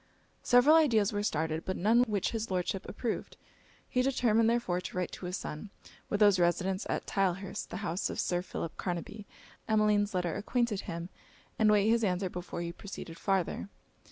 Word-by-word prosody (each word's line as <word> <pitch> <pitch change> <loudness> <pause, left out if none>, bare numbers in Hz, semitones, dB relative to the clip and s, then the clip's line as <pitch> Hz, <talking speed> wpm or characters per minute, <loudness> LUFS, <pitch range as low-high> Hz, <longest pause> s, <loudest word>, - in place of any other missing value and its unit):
Several 245 +6 +6
ideas 225 -10 +3
were 205 - 0
started, 160 -4 -1
but 185 - -3
none 225 +6 +4
which 210 -5 -1
his 225 -1 -3
Lordship 185 +1 -2
approved. 225 +1 -4 0.5
He 250 - +1
determined 230 -4 +3
therefore 230 -7 0
to 180 - -7
write 180 - -1
to 180 - -7
his 180 +2 -2
son; 155 +7 -6 0.4
with 205 - -1
whose 205 -3 +6
residence 185 +2 +1
at - - -2
Tylehurst, 195 -1 -1
the - - -5
house 175 +3 -1
of - - -5
Sir 175 -1 0
Philip 165 -2 -5
Carnaby, 195 +4 -4 0.4
Emmeline's 210 -2 +2
letter 175 -2 0
acquainted 220 0 0
him; 170 +1 -5 0.5
and 215 -1 +5
wait 210 -1 +4
his 230 +1 +3
answer 185 -2 0
before 175 -1 -5
he 170 0 -3
proceeded 170 -3 -9
farther. 195 0 -1
200 Hz, 175 wpm, -31 LUFS, 180-220 Hz, 0.5 s, Several